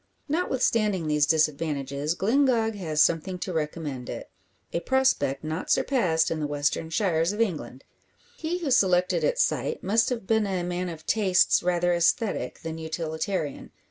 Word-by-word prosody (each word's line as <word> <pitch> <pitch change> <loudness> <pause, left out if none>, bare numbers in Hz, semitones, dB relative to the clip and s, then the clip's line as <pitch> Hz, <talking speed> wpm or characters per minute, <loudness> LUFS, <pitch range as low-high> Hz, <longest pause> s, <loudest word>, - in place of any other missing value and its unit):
Notwithstanding 230 - 0
these 150 -2 +2
disadvantages, 150 -1 0
Glyngog 230 +1 +2
has 160 -7 +1
something 170 +3 0
to 180 0 -5
recommend 150 -5 -4
it - - -7 0.4
a - - 0
prospect 170 - +1
not 155 +3 -4
surpassed 170 -12 +2
in 165 - -2
the 150 - -1
western 145 +2 -1
shires 165 0 +1
of 210 - -6
England. 150 - -2 0.5
He 340 -3 -3
who 325 -6 -3
selected 180 -6 +3
its - - +3
site 470 - -2
must 225 +4 +2
have 235 -6 -3
been 220 0 +2
a 185 -2 -2
man 180 +1 -3
of 160 -2 -9
tastes 195 -5 +3
rather 175 0 +1
aesthetic, 170 - 0
than 165 0 -5
utilitarian. 160 0 -3
175 Hz, 150 wpm, -26 LUFS, 155-215 Hz, 0.5 s, selected